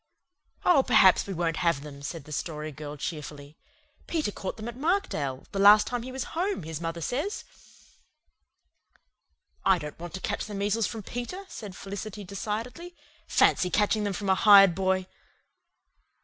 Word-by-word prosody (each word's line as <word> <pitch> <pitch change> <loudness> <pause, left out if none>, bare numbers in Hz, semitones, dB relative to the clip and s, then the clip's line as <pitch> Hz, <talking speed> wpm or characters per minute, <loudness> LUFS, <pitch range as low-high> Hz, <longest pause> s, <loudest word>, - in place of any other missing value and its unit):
"Oh, 325 -6 +6
perhaps 215 -8 +5
we 195 - -3
won't 165 -1 -1
have 170 -5 +1
them," 140 -1 -10
said 145 +2 -6
the 150 - -13
Story 155 0 -4
Girl 150 0 -8
cheerfully. 150 -1 -6 0.5
"Peter 310 -10 -1
caught 190 - -6
them 220 +1 -7
at 240 - -6
Markdale, 265 - -1
the 195 - -3
last 205 +1 +8
time 245 -1 -3
he 255 +2 -7
was 260 -1 -3
home, 365 - -1
his 160 0 -6
mother 165 0 -4
says." 290 - -2 2.2
"I 190 - +4
don't 150 -2 -8
want 175 +1 -7
to - - -5
catch 205 +2 -3
the 210 - -7
measles 205 +2 0
from 220 -2 -6
Peter," 245 - -6
said 205 -4 -8
Felicity 200 +1 -7
decidedly. 225 - -5 0.3
"Fancy 180 - +3
catching 210 +2 +1
them 205 -1 -1
from 200 +1 -3
a - - +6
hired 195 -2 +7
boy!" 190 0 0
195 Hz, 165 wpm, -27 LUFS, 165-230 Hz, 2.2 s, last